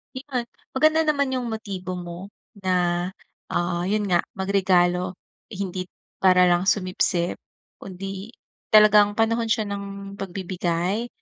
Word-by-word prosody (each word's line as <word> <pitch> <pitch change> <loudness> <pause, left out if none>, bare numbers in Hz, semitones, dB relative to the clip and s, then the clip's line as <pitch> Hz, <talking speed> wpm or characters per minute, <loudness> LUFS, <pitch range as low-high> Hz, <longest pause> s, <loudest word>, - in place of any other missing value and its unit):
Iyon. 260 -2 -3 0.3
Maganda 310 +3 +4
naman 280 -3 +2
yung 255 -2 -2
motibo 195 -5 -5
mo 175 +1 -7 0.3
na, 180 -2 +1 0.4
ah, 175 0 -1
yun 210 +1 +1
nga 175 - +5 0.2
magregalo 185 -2 +2 0.3
hindi 185 -3 -4 0.3
para 185 -1 +5
lang 175 +2 +1
sumipsip 185 -3 +1 0.4
kundi 195 +3 -7 0.4
talagang 210 -1 +6
panahon 230 +1 +1
siya 220 0 +1
ng 200 0 -6
pagbibigay 185 +2 -2
195 Hz, 110 wpm, -24 LUFS, 180-215 Hz, 0.4 s, talagang